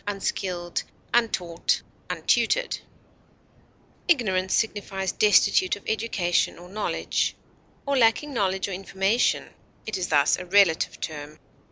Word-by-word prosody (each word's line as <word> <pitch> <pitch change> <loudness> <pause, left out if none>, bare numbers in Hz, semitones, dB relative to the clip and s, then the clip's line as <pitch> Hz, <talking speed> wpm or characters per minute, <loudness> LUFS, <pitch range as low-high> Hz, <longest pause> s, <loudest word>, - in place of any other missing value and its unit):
uneducated, 185 -3 -2 0.3
uninstructed, 180 -8 +1 0.3
unskilled, - - +1 1.3
Ignorant 190 - +2
signifies 195 -3 -1
destitute 205 -3 +4
of 205 - -13
education 205 -6 0
or 175 - -12
knowledge, 210 +2 -1 0.5
or 280 0 0
lacking 255 +4 +3
knowledge 190 -4 0
or - - -6
information; 195 +4 0 0.4
it 215 -3 -3
is 180 - -1
thus 145 -2 +3
a 180 - -6
relative 190 -3 +3
term. 150 -1 -6
195 Hz, 110 wpm, -25 LUFS, 180-220 Hz, 1.3 s, destitute